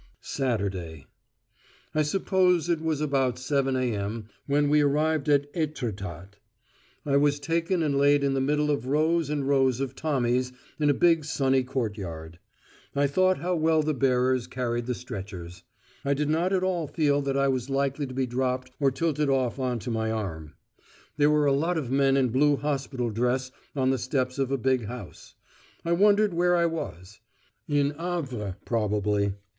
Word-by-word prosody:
SATURDAY 95 - -3 0.9
I 155 - +2
suppose 180 +1 +2
it 165 -2 +1
was 160 -2 -1
about 135 -4 +1
7.0 135 0 0 0.2
a.m. 105 +2 -4 0.2
when 145 +1 +2
we 150 +1 +4
arrived 150 +1 +1
at 145 0 +2
Étretat. 100 - -4 0.7
I 140 -1 +2
was 145 0 +2
taken 165 +3 0
and 145 -2 0
laid 145 +1 +4
in 140 -1 +1
the 135 - 0
middle 150 +2 +1
of 135 -4 -2
rows 155 +2 +1
and 145 -2 -1
rows 135 -3 +2
of 135 -1 -3
Tommies 125 -4 0 0.3
in 150 -1 +3
a - - +5
big 165 +1 +3
sunny 135 -2 +1
courtyard. 100 -11 -5 0.6
I 140 0 +3
thought 185 +6 +2
how 180 +2 0
well 160 -1 +2
the 155 0 0
bearers 130 -2 +1
carried 120 -2 -3
the 125 - -1
stretchers: 95 -7 -8 0.4
I 140 0 +1
did 150 +1 -1
not 170 +4 +1
at 185 -1 +1
all 175 -4 0
feel 145 -1 +1
that 140 -1 -1
I 140 0 +3
was 130 -1 -1
likely 140 +1 -1
to 130 - -8
be 135 0 +1
dropped 130 +1 -2
or 140 -2 +4
tilted 150 +1 0
off 130 -1 0
on 125 -2 -1
to 115 +2 -5
my 110 -1 -1
arm. 85 -9 -4 0.6
There 145 0 +4
were 150 -1 +3
a 140 - +4
lot 165 +5 +1
of 135 -6 -3
men 135 0 +3
in 130 -2 +2
blue 145 +4 +3
hospital 135 -4 -2
dress 125 +3 0 0.2
on 130 -1 +2
the 135 - 0
steps 130 +1 -1
of 135 -1 0
a 135 - +1
big 130 -2 +1
house. 125 +1 -9 0.5
I 170 - 0
wondered 205 +2 +4
where 175 +1 +3
I 170 -1 +3
was: 105 - -5 0.5
in 145 -1 +2
Havre 140 - -4
probably. 105 -2 0
135 Hz, 175 wpm, -27 LUFS, 125-150 Hz, 0.9 s, a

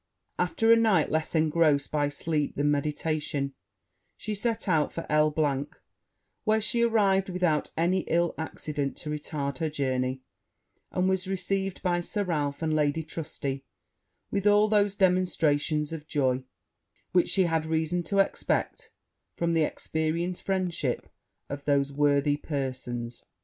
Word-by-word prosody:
After 225 -8 +2
a - - +9
night 215 -9 +3
less 160 +1 -1
engrossed 155 -2 +3
by 145 -1 +1
sleep 150 0 -1
than 145 +1 +2
meditation, 145 -1 -1 0.6
she 215 - -4
set 225 +2 -2
out 160 -5 +2
for 165 - -5
L 150 0 +4
e, 140 -3 +2 0.8
where 220 0 +3
she 220 +2 0
arrived 200 -5 +3
without 175 -4 +1
any 175 +3 +2
ill 170 0 +2
accident 150 -3 -4
to 150 - -5
retard 145 -2 -3
her 160 - 0
journey; 130 -3 -1 0.7
and 180 +1 +1
was 190 0 0
received 195 0 -2
by 175 -1 +1
Sir 205 +4 -2
Ralph 150 -4 -2
and 155 -1 +1
Lady 150 +1 +1
Trusty 145 -4 -4 0.7
with 200 0 +1
all 205 +1 +5
those 205 -2 +2
demonstrations 165 -5 +2
of 155 -1 -7
joy, 130 -4 0 0.7
which 180 -1 +3
she 190 - +3
had 165 -2 0
reason 160 +2 0
to 200 +4 -1
expect 455 - 0 0.5
from 170 0 0
the 165 - +3
experienced 160 +3 -1
friendship 180 -9 -1 0.4
of 140 0 -6
those 140 -1 +2
worthy 145 0 +2
persons. 130 -5 -4
160 Hz, 140 wpm, -28 LUFS, 145-185 Hz, 0.8 s, a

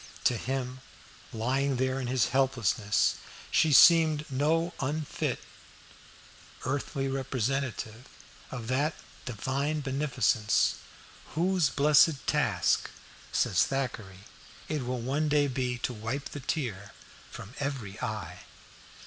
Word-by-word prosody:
To 125 - +3
him 130 +2 -3 0.5
lying 135 +5 0
there 130 +1 0
in 130 - -3
his 125 -2 +1
helplessness, 120 -5 +1 0.3
she 160 - +4
seemed 155 0 +7
no 160 +6 +1
unfit 150 +2 -2 1.2
earthly 135 0 -2
representative 130 -2 -2 0.4
of 120 -3 -6
that 140 +5 0 0.3
Divine 140 +6 -2
Beneficence 135 -6 +1 0.6
"whose 175 -2 +2
blessed 145 +2 +4
task," 115 - +1 0.4
says - - +2
Thackeray, 115 -8 -4 0.5
"it 150 -5 -3
will 125 -1 -2
one 145 +5 0
day 145 -1 +3
be 125 -2 -2
to 125 - -1
wipe 115 +6 -4
the 145 - -7
tear 110 - -3 0.4
from 100 - -10
every 130 -8 -4
eye." 95 -5 -4
135 Hz, 105 wpm, -29 LUFS, 120-145 Hz, 1.2 s, seemed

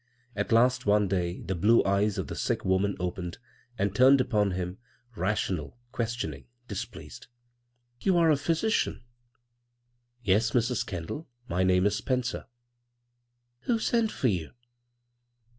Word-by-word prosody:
At - - -2
last 125 +1 +3
one 105 0 +4
day 90 -2 -1
the 95 - -3
blue 105 +7 +4
eyes 100 +1 +1
of - - -2
the - - -6
sick - - -1
woman 95 +2 +1
opened 90 -1 -4 0.4
and 100 -1 0
turned 130 +4 +6
upon 110 -6 +2
him, 90 0 -4 0.4
rational, 95 -4 -2
questioning, 110 - -3 0.2
displeased. - - -7 0.4
" 120 0 -46
You 190 -3 +3
are 165 -2 +5
a - - +5
physician? 165 - 0 0.6
" 120 0 -48 0.3
"Yes, 110 +3 +2
Mrs. 120 0 +1
Kendall. 95 - -5 0.2
My 90 +2 -1
name 95 0 +3
is 105 0 +2
Spencer." 125 +1 -2 0.6
" 120 0 -49
Who 240 - +2
sent 225 0 +1
for 130 - 0
you 90 -6 -3
110 Hz, 140 wpm, -28 LUFS, 95-125 Hz, 0.6 s, turned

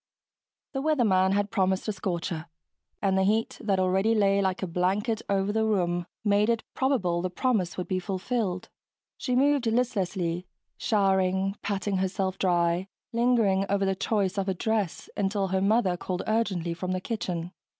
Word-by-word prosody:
The 270 - -1
weatherman 215 -11 +3
had 205 0 0
promised 190 -2 +1
a - - +1
scorcher, 175 -4 -3 0.6
and 190 -1 +2
the 190 - +3
heat 215 +3 +1
that 195 -3 +1
already 190 +4 +2
lay 200 -1 +3
like 190 0 -1
a - - +2
blanket 195 +6 0
over 195 0 +1
the 220 +1 +1
room 175 -5 0 0.2
made 205 +1 +3
it 230 -1 +2
seem - - -47
probable 195 -11 +1
the 185 - -1
promise 195 -3 0
would 180 - -3
be 185 -1 0
fulfilled. 190 0 -2 0.5
She 250 - -2
moved 275 -1 +3
listlessly, 190 -7 0 0.3
showering 195 -2 +1
patting 200 -1 -1
herself 190 0 -1
dry, 175 0 +1 0.3
lingering 230 -5 +3
over 200 0 +1
the 195 - +2
choice 200 0 0
of 195 0 -1
a 190 - 0
dress 210 -2 -1
until 195 -1 0
her 190 0 +1
mother 195 -3 +2
called 180 0 -3
urgently 195 -7 0
from 185 +2 -3
the 185 - -1
kitchen. 180 -5 -3
195 Hz, 165 wpm, -27 LUFS, 185-215 Hz, 0.6 s, weatherman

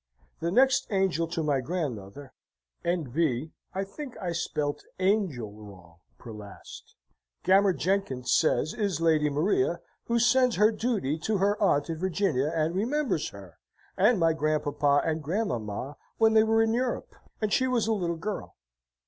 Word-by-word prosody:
The 165 - -1
next 260 +7 +3
angel 190 -5 +1
to 165 -1 -3
my 145 -3 +1
Grandmother 130 - -5 0.5
(N.B. 155 -4 -1 0.2
I 195 - 0
think 250 +7 -9
I 180 - -3
spelt 150 -3 -2
angel 185 - 0
wrong 95 -6 -14 0.2
per 120 - -10
last), 105 -2 -11 0.5
Gammer 195 +1 +5
Jenkins 175 -10 -1
says, 155 -1 +2
is 200 -7 -1
Lady 160 -2 +3
Maria, 200 - +1 0.3
who 235 - +1
sends 240 +1 +4
her 210 +3 +4
duty 210 - -1
to 215 +5 0
her 200 +2 +2
Aunt 145 -8 +2
in 165 -2 -4
Virginia, 175 -6 0
and 165 0 0
remembers 245 - 0
her, 95 -5 -13 0.4
and 210 +3 +4
my 165 -1 +3
Grandpapa 150 -2 +1
and 160 -1 -1
Grandmamma 140 - -3 0.2
when 220 -1 +4
they 220 - +6
were 225 0 +3
in 225 0 +1
Europe, 245 +1 -2 0.3
and 215 -2 -1
she 260 - +3
was 245 -4 +1
a 225 - +1
little 175 -5 -2
girl. 205 +5 -5
170 Hz, 155 wpm, -27 LUFS, 145-210 Hz, 0.5 s, they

